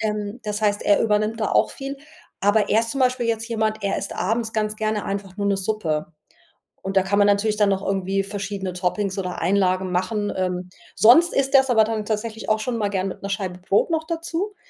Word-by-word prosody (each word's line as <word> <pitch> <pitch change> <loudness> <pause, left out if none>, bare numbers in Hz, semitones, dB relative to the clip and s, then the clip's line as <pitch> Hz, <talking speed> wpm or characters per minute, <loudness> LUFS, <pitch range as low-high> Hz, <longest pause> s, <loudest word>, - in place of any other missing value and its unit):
ähm, 210 +1 -3
das 210 -1 -3
heißt, 205 -1 +1
er 205 - +3
übernimmt 215 +1 +1
da 215 - 0
auch - - +3
viel. 275 0 -6 0.4
Aber 205 +1 +3
er 220 - +4
ist 230 0 -3
zum 275 - -3
Beispiel 255 -1 +2
jetzt 225 0 -1
jemand 220 -2 -1
er 200 -1 0
isst - - -5
abends 225 +4 -1
ganz 215 -1 -1
gerne 215 -1 -1
einfach 195 -1 -5
nur 200 -1 -1
'ne 200 -1 +2
Suppe 180 -6 -2 0.7
und 195 0 -5
da 190 - +5
kann 200 +2 +1
man 205 - +5
natürlich 205 +1 +2
dann 210 -1 +3
noch 195 0 -1
irgendwie 195 0 0
verschiedene 195 -1 -4
Toppings 185 +2 -2
oder 180 -1 -4
Einlagen 185 0 +1
machen. 205 +3 -1
Ähm, 180 -1 -2 0.3
sonst 325 +10 +6
isst 270 0 0
er 270 - +9
es 265 - -7
aber 225 -3 +5 0.2
tatsächlich 220 +1 -3
auch 215 0 +2
schon 240 +1 -2
mal 210 -2 0
gerne 195 -1 -1
mit - - -9
'ner 200 - -5
Scheibe 190 -2 -3
Brot 195 - +1
noch 320 -1 0
dazu. 335 +5 -3
210 Hz, 220 wpm, -23 LUFS, 195-225 Hz, 0.7 s, er